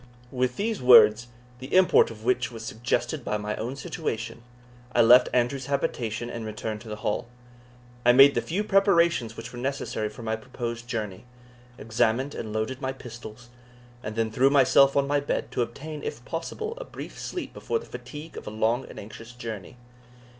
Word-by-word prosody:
With 125 -1 0
these 220 +1 -2
words, 120 -2 +7 0.3
the 130 +2 -9
import 185 -1 +6
of 110 -1 -11
which 125 -1 +1
was 115 -1 -8
suggested 120 +3 -2
by 105 - -1
my 105 0 -3
own 120 +4 -4
situation, 125 -8 -4 0.5
I 120 - +5
left 120 +2 +7
Andrew's 125 +2 0
habitation, 120 -5 -2
and 115 -1 -6
returned 110 0 -5
to 115 - -11
the 105 - -4
Hall. 105 - -1 0.8
I 120 - +7
made 135 +3 +8
the - - 0
few 190 +6 -2
preparations 170 - +3
which 115 +2 -8
were 120 - -7
necessary 125 -5 -2
for 110 +2 -11
my 110 0 -1
proposed 120 0 -6
journey, 110 -4 -4 0.5
examined 120 +5 0
and 110 - -5
loaded 110 +5 -3
my 130 0 -2
pistols, 120 -2 -11 0.5
and 105 -2 -6
then 115 -1 0
threw 130 +5 +4
myself 140 0 +5
on 140 - +3
my 145 +1 +1
bed, 145 - -3
to - - -1
obtain, 145 +6 -5
if 120 - -6
possible, 170 - -4
a - - -5
brief - - -9
sleep - - -5
before 460 - -2
the 460 - -8
fatigue 150 +2 -9
of - - -8
a - - -2
long 110 +4 0
and - - -9
anxious 115 +3 -10
journey. 115 -3 -7
120 Hz, 180 wpm, -26 LUFS, 110-140 Hz, 0.8 s, made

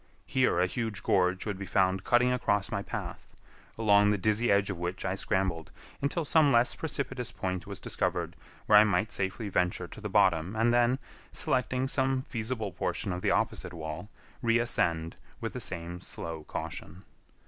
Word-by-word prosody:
Here 130 -9 +2
a 90 - +4
huge 110 +2 -3
gorge 90 -1 +2
would 105 -3 -3
be 100 - -5
found 95 -1 +2
cutting 125 +3 +3
across 100 -5 0
my 100 - -1
path, - - -7 0.4
along 105 -2 +5
the 105 - +2
dizzy 110 +3 +2
edge 100 0 +3
of 90 - -6
which 90 +1 -3
I 95 - 0
scrambled 95 -4 -1 0.3
until 150 +4 -1
some 150 -1 +5
less 120 0 +4
precipitous 130 -5 -3
point 95 -3 -4
was - - -5
discovered - - -2 0.3
where 105 - +8
I - - +8
might 105 0 +1
safely 100 +3 -2
venture 90 -2 0
to 110 - -11
the 105 - -4
bottom 95 -2 +3
and 115 +2 +3
then, 120 +1 +3 0.3
selecting 130 +1 0
some 130 -1 +1
feasible 110 -4 -3
portion 90 +2 -2
of 90 - -4
the - - +1
opposite - - 0
wall, 80 +4 -6 0.3
reascend 100 -9 +1 0.2
with - - -4
the - - -4
same 85 +1 -4
slow 80 -2 -6
caution. 95 +2 -6
100 Hz, 170 wpm, -29 LUFS, 90-120 Hz, 0.4 s, where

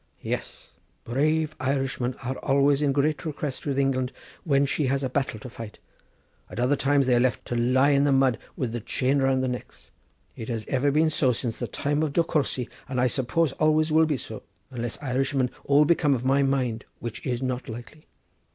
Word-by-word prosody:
"Yes, - - -5 0.3
brave 155 +5 0
Irishmen 130 -2 -1
are 130 +2 -2
always 140 0 +3
in 145 -2 +2
great 145 +2 +1
request 150 -3 -4
with 140 -1 -1
England 130 -2 +1 0.3
when 140 -3 +3
she 140 0 0
has 140 +1 0
a 130 - -2
battle 135 -4 -1
to 110 - -9
fight. 115 -3 -9 0.7
At - - -7
other 125 +4 +3
times 140 0 +2
they 125 - +3
are 120 - +4
left 125 0 0
to 120 - -3
lie 130 +4 +3
in 140 0 +4
the 145 - +3
mud 135 -3 +3 0.2
with 125 -4 -2
the 120 - -3
chain 130 +5 0
round 135 -1 +2
their 130 - 0
necks. 125 - -9 0.4
It 110 - -7
has 115 -3 -3
been 145 +4 +2
so 150 -3 +2
ever 125 - +4
since 115 -2 -3
the 120 - -2
time 145 +5 -1
of 155 -3 -1
De 170 - +3
Courcy, 140 -6 -1 0.2
and 130 -2 -1
I 125 - +3
suppose 130 +5 +1
always 155 +2 +2
will 160 +1 +5
be 150 -3 0
so, 110 -3 -7 0.3
unless 120 -2 -4
Irishmen 135 -1 0
all 145 +1 +5
become 150 -3 +3
of 125 0 -4
my 135 +2 +3
mind, 130 -4 0
which 120 -2 -7
is 125 -1 -2
not 130 -1 -3
likely. 120 +7 -10
135 Hz, 205 wpm, -26 LUFS, 125-145 Hz, 0.7 s, will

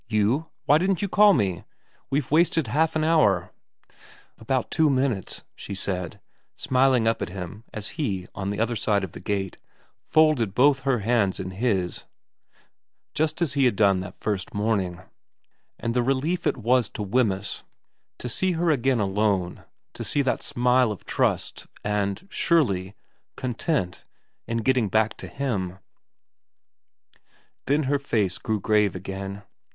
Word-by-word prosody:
' - - -44
You? 130 +10 +1 0.2
Why 150 +2 +5
didn't 190 +1 0
you - - +1
call 205 +2 +6
me? 95 - 0 0.5
We've 140 -1 -1
wasted 165 -1 +3
half 155 +7 +1
an 155 - +1
hour 125 - +3 0.3
' - - -29
' - - -28
About 125 +3 -1
two 160 -1 +3
minutes,' 130 -7 -1
she 100 - -7
said, 90 -3 -3 0.4
smiling 130 -3 +2
up 115 - +1
at - - -2
him 95 +4 -7
as 105 -1 -5
he, 100 -11 -1
on 100 -1 -4
the 100 - -3
other 115 +1 0
side 105 -2 +1
of 95 - -5
the - - -9
gate, 95 -3 -3 0.4
folded 150 -11 +3
both 135 +1 +5
her 135 -4 0
hands 105 -3 +1
in 95 0 -4
his 95 -3 -1 1.1
just 155 +2 0
as 145 -4 -1
he 140 -2 +3
had 125 - +3
done 100 -2 +4
that 90 0 -7
first 100 -3 -3
morning; 100 -5 0 0.8
and 115 +1 -2
the 125 - +2
relief 135 +8 0
it - - +1
was 120 -1 +2
to 105 - -5
Wemyss 100 -2 0 0.6
to - - -6
see 185 +10 0
her 170 0 +1
again 130 -3 +2
alone, 100 -2 0 0.3
to - - -6
see 145 - +1
that 130 - 0
smile 125 -1 +2
of 105 - -8
trust - - -1 0.2
and 105 - -1
surely 100 - +1 0.4
content 125 - -2 0.4
in 115 -1 -2
getting 125 -4 +2
back 110 +2 +2
to - - -8
him 115 -10 -2
1 95 +2 -15 1.9
Then 145 +3 +2
her 140 +1 +1
face 105 -9 -1
went 110 -3 -1
grave 105 -3 +2
again. 95 +2 -6
115 Hz, 160 wpm, -25 LUFS, 100-140 Hz, 1.9 s, call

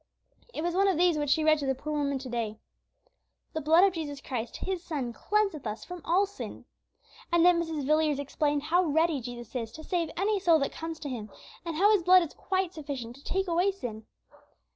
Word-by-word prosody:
It 310 - -4
was 345 0 0
one 390 +2 +3
of 380 -5 +2
these 350 -1 +4
which 290 -1 -1
she 310 +3 +3
read 310 0 +4
to 280 - -3
the 265 - +1
poor 300 +4 -5
woman 285 -2 0
to 265 0 -7
day: 230 -3 -3 1.0
"The 315 - -2
blood 320 +5 +5
of 390 -2 +4
Jesus 295 -4 -5
Christ, 245 -4 -5
His 375 -2 -3
Son, 270 -9 -3
cleanseth 395 - 0
us 215 +1 -5
from 360 -1 -8
all 370 +4 +3
sin." 400 - -8 0.7
And 340 0 +4
then 350 -1 +5
Mrs. 320 -4 -3
Villiers 305 0 +2
explained 290 +1 -1
how 350 +4 +3
ready 320 -2 +2
Jesus 240 0 -8
is 230 -3 -3
to 315 - -9
save 340 -2 -1
any 405 +2 +1
soul 340 -4 +5
that 275 - 0
comes 325 0 -6
to 290 - -4
Him, 220 -5 -5 0.3
and 335 -2 -4
how 400 +6 +5
His 415 -4 +4
blood 365 +1 +6
is 325 - -7
quite 375 -2 -1
sufficient 275 -7 -6
to 280 - -17
take 385 0 -1
away 350 +3 +2
sin. 225 - -7
315 Hz, 220 wpm, -29 LUFS, 275-355 Hz, 1.0 s, blood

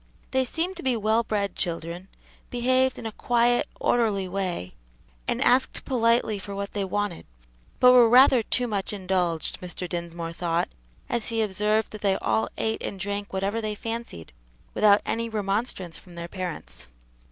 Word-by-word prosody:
They 260 0 +2
seemed 345 +8 -2
to - - -6
be 255 -3 +1
well 220 +2 +2
bred 205 -3 -2
children, 170 +1 -3 0.4
behaved 255 +2 +2
in - - -8
a 225 - -3
quiet, 240 +2 +2
orderly 210 -5 +1
way, 180 - -3 0.5
and - - 0
asked 255 +2 +2
politely 230 -4 +2
for 200 +1 -7
what 200 0 -4
they 205 - -1
wanted, 200 -2 -2 0.5
but 250 - +8
were 245 -2 +7
rather 255 0 +7
too 245 +3 0
much 205 -4 -2
indulged, 180 -4 -1
Mr. 180 0 -5
Dinsmore 170 -1 -5
thought, 170 0 -1 0.4
as 235 -2 -2
he 225 -1 0
observed 210 +2 0
that 215 - -8
they 195 -2 +2
all 220 - 0
ate 220 0 -1
and 195 - -5
drank 205 +1 -3
whatever 195 +4 -1
they 215 -1 -3
fancied, 225 - -6 0.4
without 205 -1 +5
any 230 0 -1
remonstrance 200 -4 -2
from 175 -2 -15
their 170 0 -5
parents. 180 -1 -6
205 Hz, 165 wpm, -26 LUFS, 185-235 Hz, 0.5 s, but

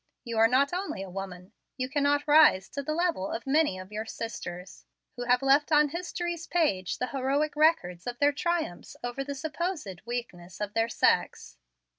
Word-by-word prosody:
You 230 -3 -3
are 225 - +7
not 270 +6 +2
only 360 - -3
a 190 - -9
woman, 185 -1 -6
but 185 - -22 0.3
you 255 - -2
cannot 285 +1 +1
rise 290 -11 +6
to 280 - -4
the 305 +2 -3
level 340 - 0
of 230 - -4
many 290 -7 +2
of 185 +2 -10
your 215 +1 -4
sisters, 185 -6 -7 0.3
who 245 - -5
have 250 +1 +3
left 280 +3 +3
on 300 -1 +5
history's 345 0 -4
page 205 - 0
the 250 - -2
heroic 275 +4 0
record 300 - +3
of 245 0 -4
their 290 +2 +4
triumphs 330 - -2
over 245 +3 -3
the 280 0 -5
supposed 310 - -4
weakness 185 -8 -6
of 210 -1 -3
their 225 0 +1
sex." - - +1
265 Hz, 185 wpm, -28 LUFS, 210-305 Hz, 0.3 s, are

